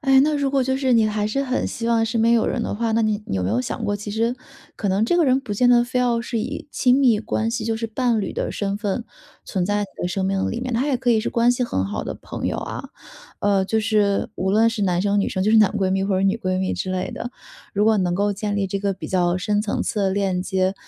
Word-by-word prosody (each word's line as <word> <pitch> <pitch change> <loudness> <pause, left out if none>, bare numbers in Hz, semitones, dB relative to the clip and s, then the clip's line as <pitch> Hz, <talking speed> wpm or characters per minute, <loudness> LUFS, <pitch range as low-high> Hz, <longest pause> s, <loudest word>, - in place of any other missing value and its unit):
哎， 270 -1 +5
那 300 +2 +2
如 280 -1 0
果 270 -1 +2
就 265 +1 0
是 260 -2 +1
你 225 -1 +4
还 210 -1 -1
是 275 +6 -1
很 255 -1 -1
希 230 - -4
望 230 -1 +3
身 225 0 -1
边 230 +1 +4
有 230 - +2
人 240 - -1
的 - - -3
话， 225 +1 -1
那 225 - +2
你 215 -1 0
你 95 - -2
有 90 - -1
没 90 - -1
有 115 +4 +1
想 - - -4
过 205 0 0
其 205 0 -7
实 230 +3 0 0.4
可 205 - -2
能 195 +3 +2
这 345 - +2
个 340 - +4
人 260 0 +3
不 250 -6 -6
见 245 +3 +3
得 240 0 +5
非 250 +1 -2
要 240 -2 +1
是 235 - -3
以 280 +6 -5
亲 255 +1 +3
密 240 -6 +4
关 220 +1 -1
系 230 -1 -3
就 225 - 0
是 230 0 -3
伴 235 0 0
侣 195 - -3
的 - - -2
身 200 -1 -2
份 215 +2 -2 0.4
存 185 -3 -2
在 205 0 0
你 - - -3 0.2
的 175 - 0
生 190 +1 -2
命 195 0 0
里 235 - -3
面， 250 -2 -3
他 255 +5 +1
也 275 -3 +1
可 245 -1 0
以 220 -2 +4
是 - - -3
关 235 +1 +3
系 245 0 -1
很 95 - -1
好 100 0 -4
的 - - -4
朋 - - -6
友 - - -1
啊。 - - -6 0.5
呃， 200 -1 +2
就 220 +3 0
是， 210 -2 +1
无 190 - -1
论 220 +3 +4
是 225 -2 -2
男 180 -2 +1
生 205 +1 +1
女 - - 0
生， 185 - -2
就 210 - +2
是 225 - +5
男 210 -2 +5
闺 195 -3 0
蜜 195 0 +1
或 195 - 0
者 - - 0
女 195 +3 +2
闺 185 -4 -2
蜜 190 - -1
之 185 - -3
类 185 0 -2
的。 245 - -6 0.4
如 205 +1 +2
果 220 -1 +4
能 180 -2 0
够 205 +2 +1
建 205 0 -3
立 195 -1 0
这 195 +1 -3
个 200 0 0
比 - - -8
较 175 -1 +1
深 210 +2 0
层 210 - -2
次 210 - -2
的 195 -1 +2
链 190 -2 0
接， 190 0 0
215 Hz, 320 characters per minute, -22 LUFS, 195-235 Hz, 0.5 s, 哎